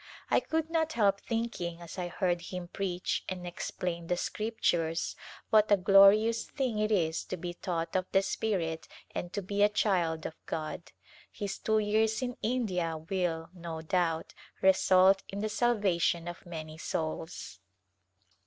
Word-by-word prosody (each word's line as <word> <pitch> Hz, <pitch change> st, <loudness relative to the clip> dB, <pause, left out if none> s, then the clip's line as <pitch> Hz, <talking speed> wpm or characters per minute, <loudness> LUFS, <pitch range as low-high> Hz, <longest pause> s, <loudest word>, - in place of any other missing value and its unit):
I -, -, +6 dB
could 320 Hz, 0 st, -2 dB
not 320 Hz, -1 st, +1 dB
help 200 Hz, -5 st, +3 dB
thinking 225 Hz, -8 st, -3 dB
as 170 Hz, +2 st, -8 dB
I 180 Hz, -, -2 dB
heard 175 Hz, -1 st, 0 dB
him 180 Hz, 0 st, -6 dB
preach 185 Hz, -2 st, -2 dB
and 180 Hz, -1 st, -5 dB
explain 175 Hz, -1 st, -4 dB
the 180 Hz, -, 0 dB
Scriptures 175 Hz, -7 st, -1 dB, 0.4 s
what 215 Hz, -1 st, +5 dB
a 205 Hz, -, +7 dB
glorious 200 Hz, +4 st, +6 dB
thing 255 Hz, -6 st, -1 dB
it 215 Hz, +1 st, +1 dB
is 165 Hz, -5 st, +1 dB
to 185 Hz, -, -4 dB
be 175 Hz, +1 st, -5 dB
taught 170 Hz, -2 st, -3 dB
of 185 Hz, 0 st, +1 dB
the 195 Hz, -, +4 dB
Spirit 175 Hz, -7 st, -1 dB, 0.3 s
and 175 Hz, -, -4 dB
to 205 Hz, -, -2 dB
be 200 Hz, +2 st, -2 dB
a 205 Hz, -, +6 dB
child 175 Hz, -6 st, +1 dB
of 160 Hz, -, -7 dB
God. 160 Hz, +2 st, -4 dB, 0.4 s
His 200 Hz, -1 st, -4 dB
two 220 Hz, 0 st, +1 dB
years 220 Hz, +2 st, +2 dB
in 250 Hz, -1 st, -3 dB
India 190 Hz, -9 st, 0 dB
will, 165 Hz, -1 st, -2 dB
no 165 Hz, -3 st, -6 dB
doubt, 165 Hz, -2 st, 0 dB, 0.3 s
result 190 Hz, 0 st, +5 dB
in 195 Hz, -, -6 dB
the 215 Hz, -, -1 dB
salvation 200 Hz, -7 st, +1 dB
of 175 Hz, +1 st, -8 dB
many 155 Hz, -2 st, -7 dB
souls. 160 Hz, -, -4 dB
185 Hz, 155 wpm, -30 LUFS, 170-210 Hz, 0.4 s, a